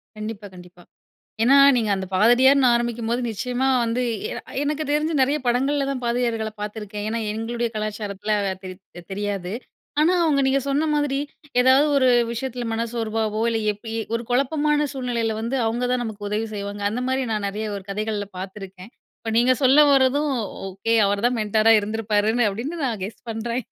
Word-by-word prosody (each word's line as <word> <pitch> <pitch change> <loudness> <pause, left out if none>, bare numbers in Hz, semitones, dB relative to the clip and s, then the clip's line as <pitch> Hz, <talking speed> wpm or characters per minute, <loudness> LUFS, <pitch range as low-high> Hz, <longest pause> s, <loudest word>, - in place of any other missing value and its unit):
கண்டிப்பா, 215 -1 -6
கண்டிப்பா. 180 0 -14 0.6
ஏன்னா 260 +4 +6 0.2
நீங்க 220 -3 0
அந்த 190 -1 -4
பாதிரியார்ன்னு 255 +7 +5
ஆரம்பிக்கும்போது 235 0 -1
நிச்சயமா 250 +4 -2 0.2
வந்து 235 +2 -1 0.3
எ - - -4 0.3
"எனக்கு 295 +1 -1
தெரிஞ்சு 305 +2 +1
நிறைய 275 +3 +3
படங்கள்ல 270 +4 +1
தான் 260 -2 -4
பாதிரியார்கள்ல 235 -2 -1
பார்த்துருக்கேன்," 210 0 -5
ஏன்னா 230 +1 -2
எங்களுடைய 235 +2 -2
கலாச்சாரத்தில 210 -1 -3
அது 190 -1 -4 0.2
தெ - - -7
தெரியாது 200 -2 -3 0.5
ஆனா 335 +4 +4
அவங்க 295 -4 +2
நீங்க 270 +1 +2
சொன்ன 285 +3 +1
மாதிரி 290 -2 0 0.4
ஏதாவது 260 +3 +5
ஒரு 260 -2 +4 0.2
விஷயத்தில 245 +1 -4
மனசோர்வவோ 225 -1 -2
இல்லை, 225 -1 0
எப்பி 210 +2 -10
இ - - -1 0.2
ஒரு 230 - -1
குழப்பமான 295 +3 +1
சூழ்நிலையில 245 -4 -2
வந்து 235 +4 -2
அவுங்க 240 +2 -1
தான் 250 -1 0
நமக்கு 210 -2 -6
உதவி 215 +2 -1
செய்வாங்க. 200 0 -5
அந்த 235 +4 -3
மாதிரி 260 0 0
நான் 210 -2 -1
நிறைய 210 +2 -4
ஒரு 200 - -7
கதைகள்ல 210 0 -2
பார்த்துருக்கேன். 195 +1 -9 0.3
இப்ப 225 - -4
நீங்க 250 +2 +4
சொல்ல 265 +2 +5
வரதும். 275 +2 +3 0.4
ஓகே 195 +4 -1
அவர்தான் 205 +5 +1
மென்டரா 215 +1 +3
இருந்திருப்பாருன்னு 215 +2 0
அப்படின்னு 255 +12 -5
"நான் 225 -7 -2
கெஸ் 210 +5 -9
பண்றேன்." 235 +1 -3
230 Hz, 160 wpm, -23 LUFS, 210-255 Hz, 0.6 s, ஏன்னா